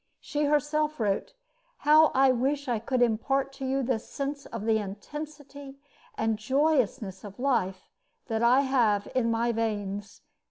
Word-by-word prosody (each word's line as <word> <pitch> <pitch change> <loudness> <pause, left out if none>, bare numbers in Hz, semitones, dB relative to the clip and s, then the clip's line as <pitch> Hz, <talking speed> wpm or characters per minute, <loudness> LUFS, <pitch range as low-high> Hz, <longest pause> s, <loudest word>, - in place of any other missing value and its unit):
She 295 0 -2
herself 300 +1 +1
wrote: 215 - -1 0.5
How 310 +1 +7
I 265 0 +5
wish 270 +3 -1
I 235 -3 0
could 245 +2 +1
impart 270 +4 0
to 270 -1 -5
you 270 +1 0
this 240 -2 -2
sense 280 0 -4
of 230 -2 -6
the 220 -1 +3
intensity 280 +6 -8 0.4
and 220 -1 0
joyousness 255 -6 0
of 200 -2 -10
life 195 -9 -1 0.4
that 225 -1 -2
I 245 +3 +5
have 235 -7 +2
in 250 -3 +1
my 230 +1 +1
veins. 205 -3 -3
255 Hz, 150 wpm, -28 LUFS, 220-280 Hz, 0.5 s, How